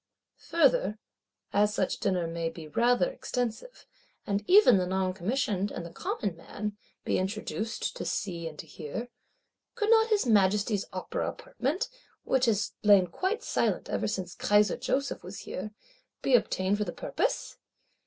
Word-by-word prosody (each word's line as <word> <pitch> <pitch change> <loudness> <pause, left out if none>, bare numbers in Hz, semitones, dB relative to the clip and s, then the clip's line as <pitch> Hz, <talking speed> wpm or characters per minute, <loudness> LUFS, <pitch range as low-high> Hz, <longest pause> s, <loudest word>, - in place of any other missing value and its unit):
Further, 255 - +3 0.6
as 210 +1 +3
such 190 - 0
Dinner 185 -3 +1
may 165 0 -2
be 165 -1 -9
rather 240 - +3
extensive, 250 - -4 0.4
and 200 0 -1
even 375 - +8
the 180 - 0
Noncommissioned 190 +2 0
and 170 - -6
the 170 - -8
Common 195 0 -3
man 205 +5 -5 0.3
be - - +1
introduced, 215 +3 -3
to - - -4
see 170 -4 -3
and 155 -2 -8
to - - -7
hear, 170 +11 -6 0.7
could 435 -2 +1
not 445 0 +6
His 425 -6 +2
Majesty's 205 -1 +3
Opera 185 0 -3
Apartment, 285 +9 -2 0.4
which 260 -1 +2
has 210 -3 +1
lain 200 -3 +6
quite 375 - -2
silent - - 0
ever - - 0
since 185 -4 -3
Kaiser 210 0 +3
Joseph 270 +2 -1
was 185 +3 -8
here, 195 +3 -5 0.5
be 270 - +1
obtained 200 -4 +2
for - - +2
the - - -5
purpose? - - -2
205 Hz, 150 wpm, -29 LUFS, 185-250 Hz, 0.7 s, even